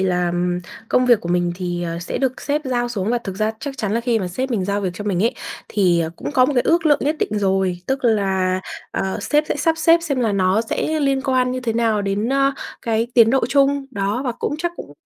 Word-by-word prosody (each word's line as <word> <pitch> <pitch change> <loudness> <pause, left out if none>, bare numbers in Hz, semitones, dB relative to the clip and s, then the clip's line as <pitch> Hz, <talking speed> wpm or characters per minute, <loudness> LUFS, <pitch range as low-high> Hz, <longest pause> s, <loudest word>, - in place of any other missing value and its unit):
là, 180 -2 +1
ừm, 175 0 0 0.3
công 250 0 +2
việc 240 -4 +5
của 170 - -6
mình 175 0 +1
thì, 175 -1 -3
ờ, 170 -1 -3
sẽ 175 - -4
được 260 -1 -1
sếp 295 +1 -1
giao 245 -2 -1
xuống 215 -2 -2
và 240 - +2
thực 195 -5 -7
ra 215 +1 +1
chắc 275 -2 -6
chắn 210 -1 -1
là 230 - +1
khi 235 -1 +1
mà 185 - -3
sếp 255 +9 -3
mình 210 -6 0
giao 200 +1 -1
việc 190 - -1
cho 205 +3 -6
mình 195 -2 0
ấy, 235 - +1 0.3
thì 180 -5 +2
cũng - - -5
có 255 -4 +5
một 290 - 0
cái 245 - +3
ước 330 -1 +2
lượng 290 -1 +4
nhất 300 +3 0
định 210 - -1
rồi. 190 -2 +1
Tức 265 -1 -2
là, 190 -4 +1 0.3
ờ, 190 0 -2
sếp 295 0 +1
sẽ - - 0
sắp 325 -1 +2
xếp 330 +1 +5
xem 280 -6 -1
là 225 -4 +1
nó 190 +2 +2
sẽ 310 +7 -1
liên 275 -2 +1
quan 255 -2 +1
như 255 - -3
thế 235 -3 -1
nào 225 -2 +1
đến, 200 +3 -1
ờ, 275 +1 +2 0.3
cái 225 0 0
tiến 230 -2 +6
độ 265 -3 +2
chung, 275 0 +2
đó, 205 +2 -1
và 245 - -1
cũng 265 - -3
chắc 345 +1 -2
cũng 145 - -9
225 Hz, 260 wpm, -20 LUFS, 190-265 Hz, 0.3 s, tiến